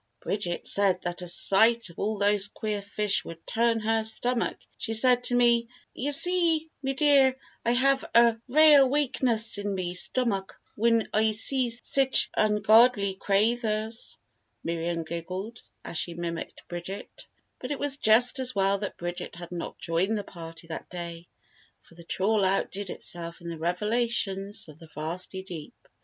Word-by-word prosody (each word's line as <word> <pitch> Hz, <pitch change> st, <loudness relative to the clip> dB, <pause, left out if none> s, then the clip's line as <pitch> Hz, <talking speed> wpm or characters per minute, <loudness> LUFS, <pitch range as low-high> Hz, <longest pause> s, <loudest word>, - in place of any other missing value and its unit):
"Bridget 180 Hz, -4 st, -4 dB
said 195 Hz, -2 st, +3 dB
that 175 Hz, 0 st, -4 dB
a 180 Hz, -, -7 dB
sight 220 Hz, +4 st, +3 dB
of -, -, -16 dB
all 215 Hz, +1 st, -2 dB
those 205 Hz, 0 st, +2 dB
queer 210 Hz, 0 st, -5 dB
fish 205 Hz, 0 st, 0 dB
would 165 Hz, 0 st, -11 dB
turn 230 Hz, 0 st, 0 dB
her 225 Hz, +1 st, 0 dB
stomach 235 Hz, +2 st, +1 dB, 0.2 s
she 225 Hz, -, -3 dB
said 245 Hz, +2 st, +6 dB
to 245 Hz, -, +2 dB
me, 235 Hz, -1 st, +3 dB, 0.3 s
'Ye 275 Hz, -, -4 dB
see, 325 Hz, +1 st, +5 dB
me 270 Hz, -1 st, -2 dB
dear, 275 Hz, -2 st, +3 dB, 0.3 s
I 235 Hz, -, +1 dB
hev 270 Hz, +2 st, +1 dB
a 235 Hz, -1 st, +5 dB
rale 290 Hz, 0 st, +6 dB
wakeness 245 Hz, -6 st, +1 dB
in 205 Hz, -1 st, -3 dB
me 180 Hz, -2 st, -4 dB
stomack 195 Hz, 0 st, -1 dB, 0.2 s
whin 230 Hz, 0 st, +1 dB
I 220 Hz, +1 st, +2 dB
see 245 Hz, +4 st, +2 dB
sich 260 Hz, +3 st, +2 dB
ungodly 215 Hz, -1 st, +3 dB
craythers.'" 220 Hz, +2 st, -1 dB, 0.5 s
Miriam 170 Hz, 0 st, -3 dB
giggled 185 Hz, +7 st, -7 dB, 0.2 s
as 165 Hz, -, -3 dB
she 170 Hz, -, -3 dB
mimicked 170 Hz, -1 st, -7 dB
Bridget. 175 Hz, +3 st, -9 dB, 0.3 s
But -, -, -7 dB
it 290 Hz, -, -3 dB
was 285 Hz, 0 st, -1 dB
just 245 Hz, +3 st, +3 dB
as 255 Hz, -2 st, 0 dB
well 195 Hz, 0 st, +1 dB
that 205 Hz, -, -6 dB
Bridget 175 Hz, 0 st, -6 dB
had 175 Hz, 0 st, -11 dB
not 175 Hz, -1 st, -7 dB
joined 185 Hz, +6 st, -1 dB
the 205 Hz, -, -4 dB
party 165 Hz, -3 st, -11 dB
that 160 Hz, -, -7 dB
day 170 Hz, -1 st, -8 dB, 0.6 s
for -, -, -21 dB
the 170 Hz, 0 st, -14 dB
trawl 200 Hz, +5 st, 0 dB
outdid 195 Hz, +1 st, -2 dB
itself 170 Hz, 0 st, -6 dB
in 170 Hz, -1 st, -9 dB
the 165 Hz, -1 st, -7 dB
revelations 200 Hz, +2 st, -2 dB
of 155 Hz, 0 st, -15 dB
the 165 Hz, -, -14 dB
vasty 175 Hz, +5 st, -5 dB
deep. 170 Hz, -5 st, -10 dB
210 Hz, 160 wpm, -26 LUFS, 180-235 Hz, 0.6 s, said